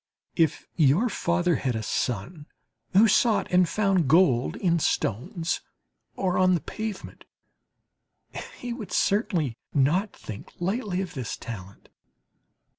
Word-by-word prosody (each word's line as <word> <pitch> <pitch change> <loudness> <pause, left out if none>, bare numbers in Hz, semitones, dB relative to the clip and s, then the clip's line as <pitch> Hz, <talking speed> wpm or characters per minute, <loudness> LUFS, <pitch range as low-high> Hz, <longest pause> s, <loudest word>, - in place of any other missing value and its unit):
If 160 -4 +1
your 165 - +3
father 175 -3 +1
had 125 -3 -1
a 110 - -3
son 125 - -3 0.5
who 205 +4 +7
sought 220 +1 +3
and 180 -1 +4
found 195 -7 +2
gold 135 -5 +4
in 170 -3 +1
stones 155 - -1 0.5
or 185 -1 0
on 185 0 +4
the - - 0
pavement, 215 +4 -6 1.3
he 245 -1 -5
would 230 -4 -8
certainly 185 - +1 0.2
not 165 +9 +2
think 110 -2 -9
lightly 190 +1 -1
of 185 - -5
this 130 -5 -4
talent. 100 -5 -9
175 Hz, 120 wpm, -26 LUFS, 135-195 Hz, 1.3 s, who